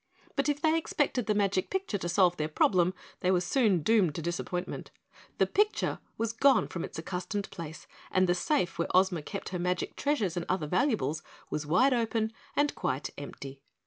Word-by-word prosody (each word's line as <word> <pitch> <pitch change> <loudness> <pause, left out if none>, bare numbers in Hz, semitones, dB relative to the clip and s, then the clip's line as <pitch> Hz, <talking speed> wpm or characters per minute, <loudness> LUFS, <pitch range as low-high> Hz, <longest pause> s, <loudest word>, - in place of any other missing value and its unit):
But 275 0 +1
if 290 0 0
they 315 +1 +3
expected 275 -7 -1
the 210 - +2
magic 195 -2 +1
picture 380 - -2
to 175 - -3
solve 180 0 +3
their 155 - 0
problem 180 +3 +2 0.2
they 180 - 0
were 185 -1 +4
soon 195 - +2
doomed 200 -8 +3
to - - -3
disappointment. 175 +1 -3 0.5
The - - +4
picture 420 +1 +1 0.2
was 230 0 -1
gone 270 +1 +4
from 170 - -4
its - - -7
accustomed 185 +5 -4
place 165 -3 -8 0.2
and 185 0 +3
the 175 - +3
safe 180 - 0
where 170 - +1
Ozma 185 -3 +3
kept 195 +6 -6
her 180 - -3
magic 180 0 -1
treasures 225 - 0
and 175 -1 -3
other 185 -4 0
valuables 170 - +1 0.3
was 150 -1 -2
wide 190 - +4
open 225 -2 0 0.2
and 290 0 +2
quite 130 +3 -2
empty. 140 -1 -8
185 Hz, 185 wpm, -30 LUFS, 170-230 Hz, 0.5 s, were